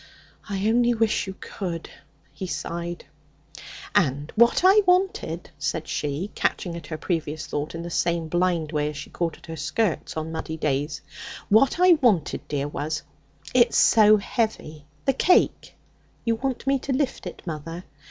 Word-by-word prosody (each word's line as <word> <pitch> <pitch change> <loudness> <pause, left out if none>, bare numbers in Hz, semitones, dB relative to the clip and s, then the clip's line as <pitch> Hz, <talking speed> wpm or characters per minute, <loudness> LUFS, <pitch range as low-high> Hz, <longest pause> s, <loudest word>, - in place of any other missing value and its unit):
'I 200 +1 -1
only 240 +1 +3
wish 220 -2 +1
you 190 - -6
could,' 170 -4 -5 0.4
he 185 +6 -5
sighed. 170 0 -4 0.9
'And 145 0 +1
what 235 +8 +4
I 390 +3 +7
wanted,' 360 - +1
said 155 +2 -2
she, 150 +7 -3
catching 175 -2 -1
at 165 -3 -8
her 155 - -4
previous 155 -2 -2
thought 150 +2 -4
in 165 - -5
the 170 - -6
same 170 -1 0
blind 175 -2 0
way 150 -1 0
as 150 - -7
she 145 - -8
caught 170 -1 -2
at - - -16
her 165 - -6
skirts 160 +4 -1
on 160 +1 -3
muddy 160 0 -4
days 145 0 -1 0.5
'what 250 +9 +4
I 360 -3 +6
wanted, 200 - +2
dear, 145 -1 -2
was 150 +1 -3 0.5
it's 240 -2 +4
so 215 -1 +6
heavy, 195 -8 -3 0.2
the 270 - +3
cake 360 +7 +2 0.2
' - - -36
'You 230 - +3
want 255 +3 -3
me 275 0 +2
to 275 - -4
lift 265 0 -1
it, - - -9
mother?' 165 +1 -6
170 Hz, 165 wpm, -25 LUFS, 155-230 Hz, 0.9 s, I